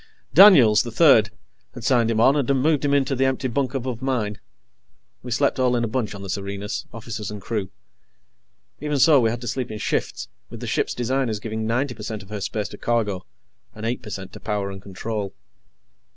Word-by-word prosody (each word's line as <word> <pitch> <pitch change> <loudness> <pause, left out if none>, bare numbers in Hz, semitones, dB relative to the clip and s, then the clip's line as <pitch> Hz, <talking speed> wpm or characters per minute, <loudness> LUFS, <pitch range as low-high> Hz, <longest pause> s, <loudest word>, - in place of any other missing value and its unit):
Daniels, 145 - +8
the 120 - -5
Third, 115 -4 +5 0.5
had 120 - -8
signed 120 -2 +3
him 110 -1 0
on 130 +5 +5
and 140 -4 0
had 140 - +3
moved 150 +1 +2
him 145 - +1
into 140 -1 +2
the 135 +1 +2
empty 130 0 0
bunk 130 +1 -1
above 125 -2 -3
mine. 115 -7 -2 0.8
We 125 - -8
slept 135 +3 +1
all 125 -1 +2
in 120 - 0
a - - 0
bunch 110 -3 -2
on 100 - -8
the - - -6
Serenus 100 +1 -4
officers 110 -2 -6
and 105 -1 -6
crew. 100 -1 -3 1.1
Even 150 0 -1
so, 145 +1 +6
we 115 -2 +3
had 120 +1 -4
to 120 - -6
sleep 125 +2 -3
in 110 - -5
shifts, 105 - -2 0.2
with - - -9
the - - -6
ship's - - -1
designers 120 -2 -1
giving 110 0 -4
ninety 125 +3 0
per 115 - -12
cent 105 -1 -5
of 95 - -17
her 105 -1 -4
space 105 +1 -3
to - - -11
cargo, 105 - -1 0.5
and 110 - -6
eight 120 +2 -2
per - - -10
cent 95 -2 -7
to - - -10
power 100 -2 -2
and 95 0 -9
control. 100 +1 -5
115 Hz, 215 wpm, -23 LUFS, 105-130 Hz, 1.1 s, Daniels